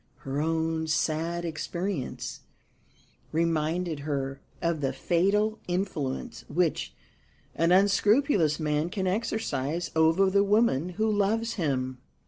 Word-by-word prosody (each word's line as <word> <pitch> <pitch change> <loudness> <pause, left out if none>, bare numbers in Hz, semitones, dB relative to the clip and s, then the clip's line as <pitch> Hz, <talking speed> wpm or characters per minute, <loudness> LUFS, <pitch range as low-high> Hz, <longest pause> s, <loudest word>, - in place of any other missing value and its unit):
Her 135 +2 -2
own 160 0 0
sad 165 +2 0
experience 170 -1 -4 0.9
reminded 165 0 0
her 140 -2 -3 0.2
of 170 -2 -1
the 135 - 0
fatal 210 +5 +1
influence 175 -7 -3
which 165 +1 0 0.6
an 165 +2 +2
unscrupulous 200 - +4
man 150 +1 0
can 190 +1 -2
exercise 175 - -1
over 165 +5 +4
the 200 +1 +4
woman 200 - +2
who 220 0 +2
loves 215 +2 +1
him. 130 - -1
170 Hz, 110 wpm, -28 LUFS, 150-195 Hz, 0.9 s, unscrupulous